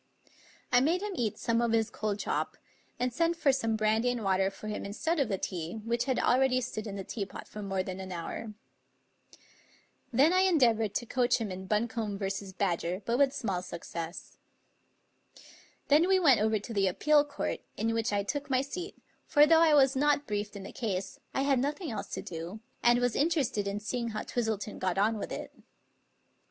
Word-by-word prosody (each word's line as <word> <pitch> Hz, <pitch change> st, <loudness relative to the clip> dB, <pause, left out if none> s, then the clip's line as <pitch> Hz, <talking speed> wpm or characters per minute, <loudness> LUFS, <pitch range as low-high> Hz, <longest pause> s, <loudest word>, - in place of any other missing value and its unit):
I 245 Hz, 0 st, +6 dB
made 340 Hz, +8 st, +1 dB
him 420 Hz, -, -3 dB
eat 230 Hz, -, -1 dB
some 230 Hz, 0 st, +1 dB
of 235 Hz, -1 st, +1 dB
his 225 Hz, -1 st, +2 dB
cold 210 Hz, -1 st, -2 dB
chop, -, -, -2 dB, 0.4 s
and 250 Hz, -1 st, 0 dB
sent 335 Hz, +6 st, +1 dB
for 300 Hz, -4 st, +3 dB
some 225 Hz, -4 st, 0 dB
brandy 220 Hz, +2 st, +2 dB
and 245 Hz, -2 st, -2 dB
water 190 Hz, 0 st, +2 dB
for 215 Hz, -, -10 dB
him 210 Hz, -, -3 dB
instead 310 Hz, +12 st, -1 dB
of 270 Hz, -5 st, +1 dB
the 195 Hz, -, 0 dB
tea, 175 Hz, -1 st, -4 dB
which 235 Hz, +1 st, 0 dB
had 260 Hz, -2 st, 0 dB
already 255 Hz, 0 st, +3 dB
stood 230 Hz, -3 st, -4 dB
in 200 Hz, -, -5 dB
the 195 Hz, -, -4 dB
tea 205 Hz, +2 st, -4 dB
pot 195 Hz, -, -9 dB
for 210 Hz, -, -8 dB
more 195 Hz, -2 st, -1 dB
than 185 Hz, 0 st, -6 dB
an 190 Hz, 0 st, -7 dB
hour. 195 Hz, +5 st, -5 dB, 1.6 s
Then 275 Hz, +8 st, +4 dB
I 370 Hz, -, +4 dB
endeavored 235 Hz, -, +3 dB
to 240 Hz, -, -1 dB
coach 245 Hz, 0 st, +2 dB
him 220 Hz, -4 st, -3 dB
in 190 Hz, +1 st, -7 dB
Buncombe 215 Hz, 0 st, -1 dB
v. 195 Hz, -1 st, -2 dB, 0.3 s
Badger, 180 Hz, 0 st, -1 dB
but 235 Hz, +2 st, 0 dB
with 280 Hz, -2 st, +5 dB
small 210 Hz, -10 st, -2 dB
success. 170 Hz, -1 st, -7 dB, 1.5 s
Then 305 Hz, +5 st, +5 dB
we 380 Hz, 0 st, +4 dB
went 275 Hz, -, +5 dB
over 220 Hz, 0 st, +2 dB
to 210 Hz, +3 st, -7 dB
the 195 Hz, -2 st, +2 dB
Appeal 295 Hz, +10 st, +4 dB
Court, 290 Hz, -1 st, -3 dB, 0.2 s
in 225 Hz, +1 st, 0 dB
which 225 Hz, -1 st, 0 dB
I 200 Hz, -1 st, +1 dB
took 285 Hz, +7 st, -3 dB
my 260 Hz, -1 st, +3 dB
seat; 355 Hz, +7 st, -6 dB, 0.3 s
for 295 Hz, -2 st, +6 dB
though 325 Hz, +1 st, +5 dB
I 315 Hz, -2 st, +6 dB
was 270 Hz, -1 st, +5 dB
not 290 Hz, +1 st, +2 dB
briefed 205 Hz, -2 st, -3 dB
in 200 Hz, -, -7 dB
the -, -, -8 dB
case, 195 Hz, -6 st, -3 dB, 0.2 s
I 270 Hz, -, +2 dB
had 275 Hz, -2 st, +3 dB
noth 285 Hz, +3 st, -1 dB
ing 345 Hz, -9 st, -4 dB
else 220 Hz, -, -4 dB
to -, -, -5 dB
do, 170 Hz, +5 st, -6 dB, 0.2 s
and 240 Hz, 0 st, +5 dB
was 245 Hz, -1 st, +1 dB
interested 280 Hz, -10 st, +1 dB
in 200 Hz, +1 st, -2 dB
seeing 235 Hz, +3 st, -3 dB
how 215 Hz, -2 st, -3 dB
Twistleton 220 Hz, -3 st, -2 dB
got 185 Hz, -1 st, -1 dB
on 215 Hz, +2 st, +2 dB
with -, -, -5 dB
it. -, -, -6 dB
225 Hz, 205 wpm, -30 LUFS, 200-270 Hz, 1.6 s, I